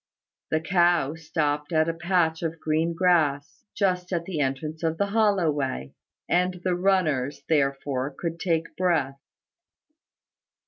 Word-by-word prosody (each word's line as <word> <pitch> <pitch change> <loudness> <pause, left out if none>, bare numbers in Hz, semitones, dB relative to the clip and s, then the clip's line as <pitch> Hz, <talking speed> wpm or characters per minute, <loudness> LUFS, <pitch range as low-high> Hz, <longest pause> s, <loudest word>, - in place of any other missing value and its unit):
The 155 - +1
cow 170 -3 +2
stopped 150 -2 -2
at 160 -1 +3
a 165 - 0
patch 170 -1 +1
of 165 -1 -3
green 160 +2 0
grass, 160 -5 +1
just 185 -3 0
at 170 -2 -1
the 170 -4 -4
entrance 145 +3 -2
of 165 -1 -1
the 200 - +1
hollow 200 -5 +2
way; 70 - -3 0.3
and 180 +1 +1
the 185 - +1
runners 175 -8 +1
therefore 140 -3 0
could 170 -1 -4
take 165 -3 -1
breath. 150 -7 0
165 Hz, 135 wpm, -25 LUFS, 145-180 Hz, 0.3 s, at